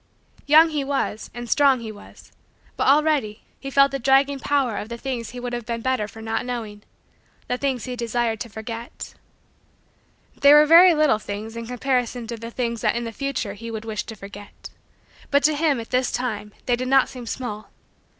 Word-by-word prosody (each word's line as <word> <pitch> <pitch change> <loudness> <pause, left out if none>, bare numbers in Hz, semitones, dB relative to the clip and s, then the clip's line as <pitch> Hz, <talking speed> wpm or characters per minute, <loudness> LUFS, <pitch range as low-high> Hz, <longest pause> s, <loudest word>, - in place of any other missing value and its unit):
Young 320 +3 +7
he 295 -2 -1
was, 270 -6 -2
and 240 +1 -7
strong 275 0 +4
he 220 -1 -6
was, 205 - -15 0.4
but, - - 0
already, 280 -7 +2 0.2
he 275 - -6
felt 275 0 +4
the 275 - -3
dragging 270 +2 +3
power 265 -6 0
of 210 - -5
the 235 - -5
things 240 -3 -4
he 250 - -8
would 245 0 -5
have 240 -2 -5
been 235 -1 -3
better 255 -4 0
for 220 +1 -11
not 225 0 -2
knowing 225 -4 -5 0.7
the - - 0
things 260 -2 -2
he 250 -1 -5
desired 235 -1 -1
to 235 - -6
forget. 225 +3 -8 1.2
They 280 +1 +6
were 300 0 +8
very 340 +3 +8
little 300 -8 +3
things 215 +2 -6
in 230 0 -6
comparison 250 -1 -1
to 235 +1 -5
the 230 +1 -7
things 235 -1 -3
that - - +1
in 235 - -2
the 230 - -5
future 265 -4 -3
he 230 +3 -8
would 220 -1 -6
wish 215 -3 -3
to 225 - -8
forget; 200 0 -11 0.6
but 285 0 +3
to 310 - +4
him, 295 -4 +1
at 225 - -9
this 255 0 +1
time, 215 -4 -3
they 245 - +2
did 255 +1 -4
not 270 0 +4
seem 245 -2 -9
small. 220 -4 -5
245 Hz, 200 wpm, -23 LUFS, 225-275 Hz, 1.2 s, were